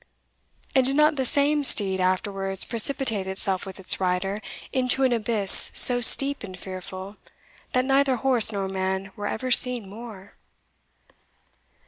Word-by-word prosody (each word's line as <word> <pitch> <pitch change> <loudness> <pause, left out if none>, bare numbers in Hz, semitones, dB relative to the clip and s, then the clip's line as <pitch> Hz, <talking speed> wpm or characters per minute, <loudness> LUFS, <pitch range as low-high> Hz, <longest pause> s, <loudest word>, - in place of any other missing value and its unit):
and 265 - +1
did 270 +2 -2
not 300 +1 +1
the 265 -3 -3
same 290 +2 0
steed 195 -7 +5
afterwards 195 +1 -4
precipitate 230 -4 +1
itself 190 0 -4
with 190 0 -11
its 190 - -2
rider 190 +2 -4 0.3
into 260 +1 -1
an 255 -2 0
abyss 215 -3 +4
so 245 -1 +5
steep 275 +4 +5
and 185 -3 -11
fearful, 185 +2 -11 0.6
that 255 0 -1
neither 270 0 -1
horse 245 -2 +2
nor 200 -2 -6
man 190 0 -6
were 205 0 -7
ever 255 +3 -6
seen 245 -4 +1
more? 205 -2 -14
210 Hz, 140 wpm, -22 LUFS, 190-255 Hz, 0.6 s, steed